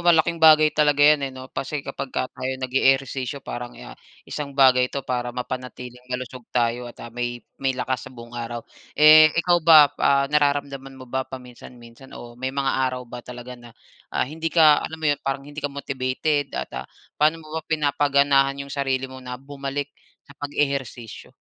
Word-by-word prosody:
malaking 170 -1 +3
bagay 155 -1 +7
talaga 145 -1 +3
'yan, 145 -2 +4
eh, - - -10
'no? 130 0 -10
Kasi 140 +1 -4
kapag 135 0 -5
ka - - -1
tayo 130 +1 -4
nag-eehersisyo 135 +1 0
parang, 120 0 -6
ah, - - -10 0.3
isang 140 -2 -6
bagay 125 -2 +5
'to 140 -1 -5
para 125 -1 -2
mapanatiling 125 0 -7
malusog 125 0 -5
tayo 120 0 0
at, - - -13
ah, 120 - -10
may 120 0 -4 0.2
may 135 -1 0
lakas 130 -1 -3
sa - - -17
buong 120 -1 -12
araw. 120 0 -5 0.3
Eh, 155 +1 +9
ikaw 175 0 +3
ba, 155 -2 +9 0.2
ah, 140 0 +4
nararamdaman 140 -2 0
mo 130 - -10
ba 130 +2 -2
paminsan-minsan 125 0 -12
o 120 0 -10
may 130 +2 -4
mga 135 0 -1 0.2
araw 125 0 -6
ba 120 +1 -8
talaga 125 +1 -9
na, 120 -1 -14 0.4
ah, - - 0
hindi 160 +3 -4
ka 155 -3 +5
alam 160 0 -6
mo 160 - -2
'yon, 145 -1 +1
parang 135 0 -3
hindi 145 +1 -8
ka 145 - -1
motivated 140 +1 -2
at, 65 - -4
ah, - - -5 0.3
paano 155 +2 +2
mo 155 +1 -10
ba 160 - -3
pinapaganahan 140 -2 +2
yung 140 - -10
sarili 135 -2 -1
mo 130 0 -11
na 125 0 -7
bumalik 140 +1 -5 0.4
sa 140 - -14
pag-ehersisyo? 140 -5 -3
135 Hz, 185 wpm, -23 LUFS, 125-145 Hz, 0.4 s, Eh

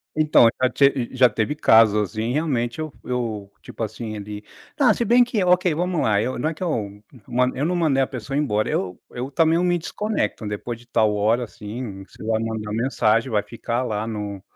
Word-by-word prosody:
Então, 155 -6 +5
já 130 - +4
te 135 -3 +2
já 130 -1 +5
teve 115 +7 -1
casos, 105 -7 +4
assim, 110 +2 -2
realmente, 130 -5 -1
eu 155 -1 -4
eu, 110 -5 -3
tipo - - -7
assim, 110 0 -5
ele 105 0 -7 0.4
ah, 245 -7 +5
se 235 - -1
bem 245 +2 +6
que, 230 -5 -1
ok, 180 -1 +3
vamos 175 0 -1
lá, 105 -2 +2
eu 125 +2 -2
não 155 - 0
é - - -4
que 160 - -7
eu 105 - -3 0.2
man 125 +1 +2
eu 140 - -1
não 180 +2 0
mandei 155 -6 +2
a 130 - +1
pessoa 130 +1 -6
ir - - +2
embora. 110 -7 0
Eu 90 -2 -2
eu 125 +2 -5
também, 160 +3 +3
eu 175 - +2
me 175 -1 +2
desconecto, 205 - -3
depois 110 +3 -5
de 120 - -18
tal 110 -2 +2
hora, 110 +4 +2
assim, 105 -2 -7
você 95 - -14
vai 110 0 0
mandar 110 -2 -4
mensagem, 115 0 +1
vai 105 -1 +1
ficar 115 +3 -3
lá 110 -3 -2
no 105 -3 -5
120 Hz, 215 wpm, -22 LUFS, 105-150 Hz, 0.4 s, bem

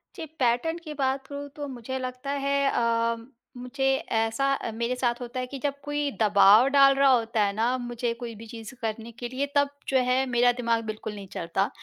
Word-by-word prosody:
जी, - - -6
pattern 250 +7 +1
की 305 -2 -6
बात 270 -1 -1
करूँ 285 0 -6
तो 290 -1 -5
मुझे 260 0 -5
लगता 255 +2 -5
है 280 0 +2
अ, 230 -1 +1 0.4
मुझे 250 +2 -3 0.3
ऐसा 225 +4 +1 0.3
मेरे 235 +2 -1
साथ 240 -1 -1
होता 245 +1 -5
है 255 - -3
कि 275 +1 -7
जब 280 +1 -2
कोई 290 0 -1
दबाव 210 +3 +6
डाल 275 -1 +6
रहा 275 0 +5
होता 225 -3 +2
है 200 - 0
ना, 235 +4 +1
मुझे 240 -1 -3
कोई 235 0 -7
भी 225 +2 -11
चीज़ 225 +1 -9
करने 225 +1 -4
के 240 +2 -6
लिए 260 +3 -1
तब 285 0 +4 0.2
जो 270 - +2
है 255 +1 +2
मेरा 245 0 +4
दिमाग 235 -2 0
बिल्कुल 215 0 -5
नहीं 200 -1 -9
चलता। 175 +4 -1
245 Hz, 205 wpm, -26 LUFS, 230-275 Hz, 0.4 s, दबाव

